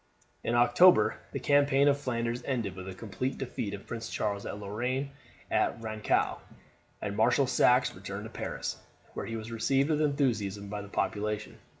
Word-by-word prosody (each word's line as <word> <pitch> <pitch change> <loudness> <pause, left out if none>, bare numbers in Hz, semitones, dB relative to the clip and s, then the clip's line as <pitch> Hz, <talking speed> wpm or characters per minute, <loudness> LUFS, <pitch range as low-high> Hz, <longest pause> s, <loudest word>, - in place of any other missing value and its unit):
In 120 - 0
October 120 +10 +6
the - - -3
campaign 145 -1 +4
of 140 - +5
Flanders 120 -3 -2
ended 115 -9 -2
with 95 0 -8
the 95 - -6
complete 115 +6 -3
defeat 110 -5 -4
of 100 - -12
Prince 115 -1 -5
Charles 100 -1 -2
of 105 - -5
Lorraine 125 +7 -2 0.4
at - - +1
Rancaux, 110 -1 0 0.6
and 100 -1 -2
Marshal 120 +6 +4
Saxe 125 0 +4
returned 100 +2 -6
to 110 - -8
Paris, - - -4 0.4
where - - -5
he 115 - -4
was 110 +1 -7
received 135 +6 +1
with 150 0 +2
enthusiasm 110 -9 0
by 105 0 -4
the 100 - -10
population. 105 +1 -2
115 Hz, 170 wpm, -30 LUFS, 105-135 Hz, 0.6 s, October